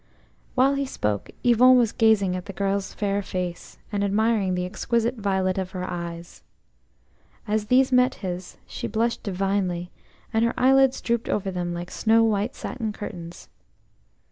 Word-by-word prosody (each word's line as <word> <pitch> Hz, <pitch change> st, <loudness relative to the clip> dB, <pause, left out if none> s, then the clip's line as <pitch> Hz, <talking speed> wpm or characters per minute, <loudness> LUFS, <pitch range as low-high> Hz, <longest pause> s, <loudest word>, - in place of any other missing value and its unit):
HILE 265 Hz, +2 st, +5 dB
he 280 Hz, 0 st, -1 dB
spoke, 105 Hz, -, -2 dB
Yvon 250 Hz, +1 st, +6 dB
was 235 Hz, -3 st, +3 dB
gazing 210 Hz, -5 st, +3 dB
at 180 Hz, 0 st, -5 dB
the 200 Hz, -, -6 dB
girl's 195 Hz, 0 st, -1 dB
fair 200 Hz, -1 st, -1 dB
face, 180 Hz, -2 st, -5 dB
and 205 Hz, -1 st, -1 dB
admiring 205 Hz, -2 st, +1 dB
the 180 Hz, 0 st, -1 dB
exquisite 235 Hz, +5 st, -1 dB
violet 190 Hz, -2 st, 0 dB
of 185 Hz, -1 st, -3 dB
her 180 Hz, -, -3 dB
eyes. 170 Hz, -1 st, -6 dB, 1.1 s
As 210 Hz, 0 st, 0 dB
these 260 Hz, +3 st, +4 dB
met 250 Hz, +1 st, +4 dB
his 180 Hz, -1 st, -6 dB
she -, -, -5 dB
blushed 230 Hz, +1 st, -1 dB
divinely, 190 Hz, -3 st, -1 dB, 0.4 s
and 225 Hz, +1 st, +2 dB
her 235 Hz, -, +1 dB
eyelids 270 Hz, +1 st, +4 dB
drooped 235 Hz, -1 st, -1 dB
over 195 Hz, -2 st, -1 dB
them 175 Hz, -1 st, -3 dB
like 175 Hz, +1 st, -6 dB
snow 225 Hz, +1 st, +3 dB
white 215 Hz, +2 st, 0 dB
satin 225 Hz, -4 st, -4 dB
curtains. 175 Hz, -5 st, -8 dB
200 Hz, 155 wpm, -24 LUFS, 180-230 Hz, 1.1 s, Yvon